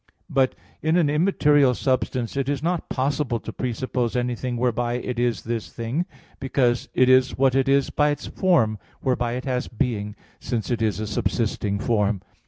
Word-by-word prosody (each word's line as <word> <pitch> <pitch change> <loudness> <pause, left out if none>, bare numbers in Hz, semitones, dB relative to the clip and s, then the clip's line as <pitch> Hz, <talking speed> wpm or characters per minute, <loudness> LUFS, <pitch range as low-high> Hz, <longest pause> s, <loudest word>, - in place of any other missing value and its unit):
But 135 -1 +2 0.3
in 160 +2 +2
an 155 -5 +3
immaterial 150 -5 +3
substance 130 -2 -1
it 135 -1 -1
is 145 0 -2
not 175 0 -1
possible 135 -2 0
to 115 - -8
presuppose 125 0 -2
anything 125 0 -1
whereby 120 0 0
it 125 0 -3
is 120 -1 0
this 115 -1 -3
thing; 125 +10 -2 0.3
because 130 -3 +1
it 130 - +5
is 130 0 +4
what 135 -1 +3
it 135 0 +2
is 140 -1 +3
by 150 0 +2
its 145 0 -3
form, 115 - +2 0.2
whereby 120 -2 0
it 125 +1 -4
has 125 -2 -1
being, 105 -4 -2 0.2
since 115 -2 -3
it 115 -2 0
is 105 -2 0
a 110 - -2
subsisting 100 0 -1
form. 105 -3 0
125 Hz, 175 wpm, -24 LUFS, 115-135 Hz, 0.3 s, it